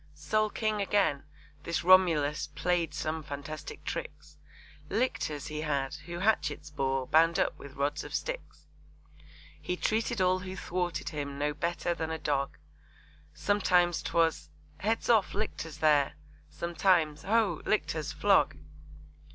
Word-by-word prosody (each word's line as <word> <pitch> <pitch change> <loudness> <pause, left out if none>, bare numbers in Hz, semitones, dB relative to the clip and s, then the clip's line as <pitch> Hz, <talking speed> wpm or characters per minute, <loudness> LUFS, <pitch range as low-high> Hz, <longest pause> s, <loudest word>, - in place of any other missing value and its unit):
Sole 215 +9 +1
King 215 0 -1
again, 195 -8 +1 0.4
this 170 +1 -2
Romulus 165 -5 +4
Play'd 170 +1 +1
some 155 +1 -3
fantastic 145 +1 -7
tricks, - - -6 0.5
Lictors 195 - -1
he 150 0 -4
had, 140 -3 -1
who 175 0 -5
hatchets 150 -7 0
bore 135 -2 -1
Bound 165 +5 +4
up - - +1
with 140 -2 -11
rods 145 +1 -1
of - - -6
sticks. - - -5 1.0
He 180 - -2
treated 225 +2 0
all 185 0 +3
who 185 0 -6
thwarted 180 -1 -2
him 140 -2 -5
No 150 +1 0
better 170 +2 -1
than 160 -1 -3
a 160 - -2
dog, 140 -3 -1 0.8
Sometimes 180 -4 +2
'twas 165 -1 +1 0.3
'Heads 225 +3 0
off, 220 -6 +3
Lictors, 165 -7 -4
there!' 150 -3 +3 0.4
Sometimes 170 -3 +1
'Ho! 205 -5 +1
Lictors, 160 -7 0
flog!' - - +3
165 Hz, 130 wpm, -30 LUFS, 150-190 Hz, 1.0 s, Romulus